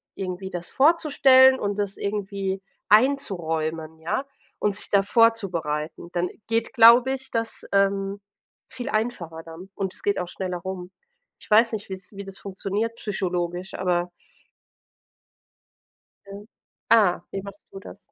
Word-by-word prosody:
irgendwie 190 0 -5
das 175 -2 -6
vorzustellen 265 -4 +5
und 205 0 -2
das 200 -1 -2
irgendwie 195 -1 -3 0.3
einzuräumen, 165 - +1
ja, 175 +12 -2 0.3
und 205 -1 0
sich - - -7
da 200 -1 +4
vorzubereiten. 175 -9 +1
Dann 175 0 0 0.2
geht, 230 0 -1
glaube 240 +3 +7
ich, 265 0 -6
das, 225 -1 -2
ähm, 195 0 +1 0.5
viel 250 +2 -6
einfacher 200 - -3
dann 165 +4 -11
und 190 -2 -3
es - - -10
geht 205 - +1
auch 180 - -3
schneller 185 -1 -4
rum. 185 -1 -6 0.5
Ich - - -17
weiß 225 +2 +5
nicht, 210 -2 -5
wie's 190 +1 -8
wie 200 0 -7
das 195 0 -9
funktioniert 200 +4 -3
psychologisch, 180 -2 -3
aber 180 -1 0 2.8
Ah, 205 -7 +4
wie 195 - -4
machst 200 +1 -11
du 195 - -9
das? 195 - -11
195 Hz, 135 wpm, -24 LUFS, 180-225 Hz, 2.8 s, glaube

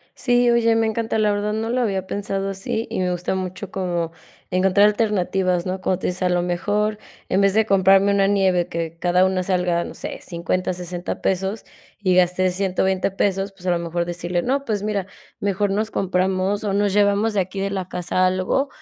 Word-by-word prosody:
Sí. 245 -1 +3
Oye, 230 -1 +3
me 225 0 +2
encanta 220 0 -1
la 210 -1 +3
verdad, 205 +1 -1
no 225 +1 -2
lo 250 +1 +1
había 190 -4 -1
pensado 195 -1 -3
así 195 +3 -3
y - - -3
me 180 -1 0
gusta 180 +1 -2
mucho 185 +1 -5
como 175 -3 -2 0.4
encontrar 190 +2 +4
alternativas, 190 -4 0
¿no? 185 +1 -3
Como 185 -1 0
tú - - -3
dices: 180 +1 -3
"A 180 - +3
lo 175 0 +1
mejor 205 +4 -1 0.3
en 190 - +2
vez 195 0 +3
de 220 0 +3
comprarme 195 0 +4
una 195 -1 +3
nieve 190 -3 +2
que 165 0 -4
cada 180 +1 +3
una 190 -1 +1
salga, 180 -2 0
no - - -8
sé, - - -6
$50, 180 +1 -2
$60, 175 0 -5
pesos, 195 +3 -1 0.4
y 185 -2 +3
gasté 185 +1 +3
$120 190 0 0
pesos", 195 0 -1
pues 185 -1 -13
a - - +2
lo 175 - +2
mejor 170 0 -2
decirle: 175 0 -2
"No, 275 +2 0
pues 210 -5 -2
mira, 205 -3 -2 0.3
mejor 200 0 0
nos 215 +2 -1
compramos 190 +2 0
o 200 - 0
nos 200 -1 +1
llevamos 205 +1 +2
de 200 - +2
aquí 190 +1 -3
de 195 0 -1
la 190 -2 -3
casa 180 +1 0
algo", 185 +10 0
190 Hz, 205 wpm, -22 LUFS, 180-205 Hz, 0.4 s, encontrar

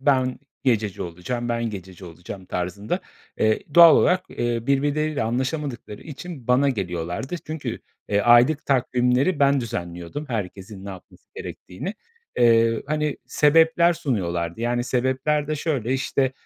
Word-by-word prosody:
"Ben 130 -2 +2 0.3
gececi 110 -6 +1
olacağım, 105 +8 -4
ben 115 -1 -1
gececi 95 -2 -9
olacağım," 90 +3 -9
tarzında. 90 +4 -3 0.4
Eee, 110 0 +2
doğal 170 -1 +9
olarak, 185 +1 +3
eee, 120 0 -1
birbirleriyle 145 +1 +1
anlaşamadıkları 130 0 -3
için 150 -3 -9
bana 130 +3 +4
geliyorlardı. 90 - -3
Çünkü, 145 -7 -4 0.3
eee, 100 -1 +2
aylık 120 +7 +5
takvimleri 130 +4 +2
ben 140 -1 +4
düzenliyordum 90 - -5
eherkesin 100 -2 -5
ne - - -7
yapması 95 -2 -13
gerektiğini. 175 - -7 0.4
Eee, 115 -1 +4
hani, 150 -1 -1
sebepler 165 +3 +4
sunuyorlardı. 85 - -2
Yani, 120 +1 0
sebepler 130 +4 0
de 155 +1 -2
şöyle, 135 -6 -1
işte, 135 0 0
125 Hz, 130 wpm, -23 LUFS, 105-145 Hz, 0.4 s, doğal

